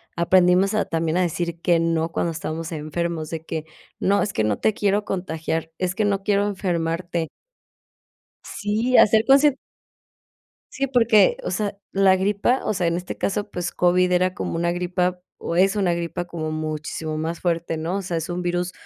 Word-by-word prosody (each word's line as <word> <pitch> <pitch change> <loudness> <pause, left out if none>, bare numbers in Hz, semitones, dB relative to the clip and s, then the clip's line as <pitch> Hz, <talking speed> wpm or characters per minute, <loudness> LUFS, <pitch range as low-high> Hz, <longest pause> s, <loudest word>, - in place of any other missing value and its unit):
aprendimos 180 +3 +4
a 215 - +1
también 165 0 -1
a - - +3
decir 170 -1 -2
que 170 -1 +3
no 165 0 0
cuando 170 - -1
estamos 165 0 -5
enfermos, 160 +1 -3
de 160 -1 -6
que 160 -1 -4 0.3
no, 200 +1 +2
es 205 - -3
que 110 - 0
no 105 -1 0
te 220 - +2
quiero 205 0 0
contagiar, 165 -3 -3
es 185 -1 -1
que 210 +3 0
no 200 -1 0
quiero 205 0 +2
enfermarte. 170 -3 -2 1.1
Sí, 220 +5 0
a - - +8
ser 220 +1 +3
conscien 275 +1 +5 1.2
sí, 275 +1 -1
porque, 230 -6 +4
o - - -3
sea, 200 +2 -2
la 195 -1 +4
gripa, 205 +6 +1
o - - 0
sea, 180 -2 0
en 170 - +1
este 180 +1 -6
caso, 205 +1 -2
pues 175 -2 -3
COVID 180 0 +2
era 185 +1 +2
como - - -4
una 170 +1 0
gripa, 180 +1 -1 0.2
o 170 - -3
es 195 +3 +4
una 190 -4 +1
gripa 170 +1 -4
como 160 -3 -4
muchísimo 155 0 -4
más 165 +2 -3
fuerte, 170 -2 -1
¿no?, 165 +4 -2
o 200 - -2
sea, 175 -2 -3
es 160 - -5
un 175 0 -3
virus 175 0 -1
180 Hz, 190 wpm, -23 LUFS, 165-195 Hz, 1.2 s, a